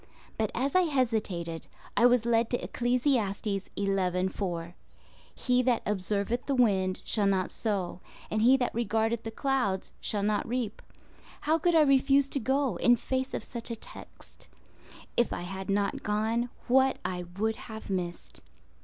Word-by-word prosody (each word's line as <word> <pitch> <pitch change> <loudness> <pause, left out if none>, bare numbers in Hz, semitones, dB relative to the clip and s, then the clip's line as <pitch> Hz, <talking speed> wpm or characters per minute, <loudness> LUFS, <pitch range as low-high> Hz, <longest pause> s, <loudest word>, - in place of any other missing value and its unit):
But 220 -2 0
as 270 +3 0
I 370 - +5
hesitated, 220 - -1 0.3
I 245 - +6
was 245 -2 +3
led 230 -1 +2
to 245 - +1
Ecclesiastes 240 -4 0 0.3
11:4—"He 185 +4 -2
that 250 -2 +1
observeth 210 +4 -1
the 280 - +1
wind 190 -6 +2
shall 205 -3 +1
not 190 -2 +1
sow, 195 -5 -2 0.3
and 215 - +1
he 255 +4 +6
that 250 -2 -1
regardeth 225 0 0
the 225 - -5
clouds 235 -6 -1
shall 205 -2 -1
not 210 +2 0
reap." 235 -3 -3 0.6
How 315 +2 +2
could 345 +1 +2
I 320 - +7
refuse 275 0 +4
to 280 - 0
go, 270 +2 0
in 245 - +5
face 260 +2 -2
of - - -3
such 235 -1 -3
a 230 - -2
text? 225 - -11 0.7
If 240 - +2
I - - -3
had 190 +2 -6
not 200 0 0
gone, 220 +3 0 0.2
what 265 +1 +4
I 180 -1 -3
would 220 +1 0
have 220 -3 -8
missed! 175 -2 -4
225 Hz, 155 wpm, -29 LUFS, 195-250 Hz, 0.7 s, I